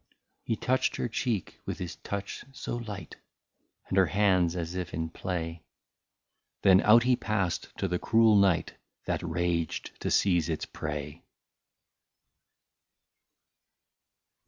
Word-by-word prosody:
He 115 Hz, -, -1 dB
touched 130 Hz, +4 st, +1 dB
her -, -, -1 dB
cheek 115 Hz, -4 st, -2 dB
with -, -, -3 dB
his 90 Hz, -2 st, -6 dB
touch 100 Hz, 0 st, -5 dB
so 120 Hz, -, -4 dB
light. 105 Hz, -8 st, -7 dB, 0.7 s
And 95 Hz, -, +2 dB
her 95 Hz, -, +5 dB
hands 95 Hz, -4 st, +2 dB
as 85 Hz, -1 st, -3 dB
if 90 Hz, -1 st, -4 dB
in 80 Hz, 0 st, -3 dB
play; 85 Hz, -2 st, -4 dB, 1.0 s
Then 95 Hz, 0 st, +7 dB
out 115 Hz, +3 st, +6 dB
he 125 Hz, 0 st, +4 dB
passed 100 Hz, -7 st, -1 dB
to 95 Hz, -, 0 dB
the 90 Hz, -1 st, -1 dB
cruel 110 Hz, -1 st, +4 dB
night, 100 Hz, -4 st, +3 dB, 0.3 s
That -, -, -1 dB
raged 85 Hz, -1 st, -1 dB
to -, -, -1 dB
seize 85 Hz, -4 st, +3 dB
its 80 Hz, -, -2 dB
prey. 75 Hz, +1 st, -5 dB
90 Hz, 125 wpm, -29 LUFS, 85-105 Hz, 1.0 s, Then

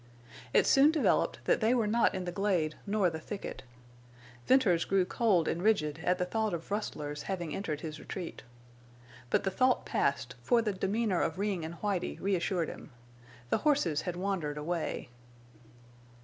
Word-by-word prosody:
It -, -, +4 dB
soon 275 Hz, +2 st, +6 dB
developed 315 Hz, -2 st, +1 dB
that -, -, +2 dB
they 225 Hz, +3 st, +3 dB
were 235 Hz, -3 st, +2 dB
not 225 Hz, 0 st, +2 dB
in 185 Hz, -1 st, -3 dB
the 175 Hz, -, -3 dB
glade 175 Hz, -5 st, 0 dB
nor 200 Hz, -3 st, +2 dB
the 160 Hz, -, -5 dB
thicket. 200 Hz, +5 st, -6 dB, 0.9 s
Venters 210 Hz, -11 st, +4 dB
grew 195 Hz, -2 st, +2 dB
cold 190 Hz, -5 st, +2 dB
and 170 Hz, -, -1 dB
rigid 165 Hz, -8 st, +1 dB
at 180 Hz, 0 st, +2 dB
the 180 Hz, -, 0 dB
thought 215 Hz, 0 st, -1 dB
of 165 Hz, +3 st, -9 dB
rustlers 150 Hz, -8 st, -3 dB
having 175 Hz, -5 st, -3 dB
entered 155 Hz, -6 st, -3 dB
his 155 Hz, -2 st, -6 dB
retreat. 175 Hz, +2 st, -6 dB, 0.9 s
But -, -, +2 dB
the 195 Hz, -, 0 dB
thought 255 Hz, +6 st, +2 dB
passed, -, -, 0 dB
for 240 Hz, -2 st, +3 dB
the 210 Hz, -2 st, 0 dB
demeanor 195 Hz, 0 st, 0 dB
of 160 Hz, 0 st, -1 dB
Ring 195 Hz, -4 st, -1 dB
and 160 Hz, +2 st, -5 dB
Whitie 200 Hz, -4 st, -1 dB
reassured 180 Hz, -2 st, 0 dB
him. -, -, -9 dB, 0.6 s
The -, -, +3 dB
horses 270 Hz, -, +2 dB
had 180 Hz, -2 st, -4 dB
wandered 175 Hz, -6 st, -2 dB
away. 160 Hz, -3 st, -3 dB
185 Hz, 165 wpm, -31 LUFS, 165-210 Hz, 0.9 s, soon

